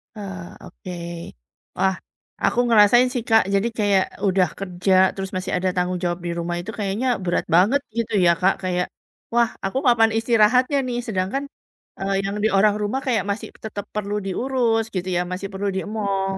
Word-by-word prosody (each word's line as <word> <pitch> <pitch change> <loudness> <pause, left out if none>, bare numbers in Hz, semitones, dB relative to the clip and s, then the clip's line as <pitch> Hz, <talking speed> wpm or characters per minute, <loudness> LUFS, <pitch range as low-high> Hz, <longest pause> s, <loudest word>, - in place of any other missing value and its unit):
Ah, 195 -4 -7 0.2
oke. 180 - -9 0.8
Wah. 190 -1 +2 0.5
Aku 245 - 0
ngerasain 230 +2 +6
sih 245 -4 -2
Kak, 225 0 +6
jadi 200 +4 +2
kayak 200 -3 +3 0.2
udah 185 -1 +3
kerja 185 0 -1 0.2
terus 195 -1 -5
masih 185 +1 -3
ada 185 +1 0
tanggung 180 0 0
jawab 175 0 -1
di 170 - -1
rumah 170 +1 -2
itu 185 +5 -6
kayaknya 205 +5 -1 0.2
berat 175 -1 0
banget 220 +11 +4 0.2
gitu 230 -2 -2
ya 170 - +6
Kak, 190 +1 +4
kayak, 180 -1 0 0.5
"Wah, 235 -1 +3 0.2
aku 195 - -2
kapan 225 -2 +5
istirahatnya 240 +4 +3
nih?" 240 - -2
Sedangkan, 195 +6 -1 0.6
eee, 195 +1 -1
yang 200 +1 -2
di - - +5
orang 205 +1 +4
rumah 210 +6 -1
kayak 240 -4 +2
masih 205 - -4 0.2
tetap 205 -2 -5
perlu 205 0 -2
diurus, 230 +2 0
gitu 180 0 -2
ya, - - +2
masih 190 +2 -4
perlu 200 +1 -2
diemong 195 -1 -2
200 Hz, 170 wpm, -22 LUFS, 185-225 Hz, 0.8 s, ngerasain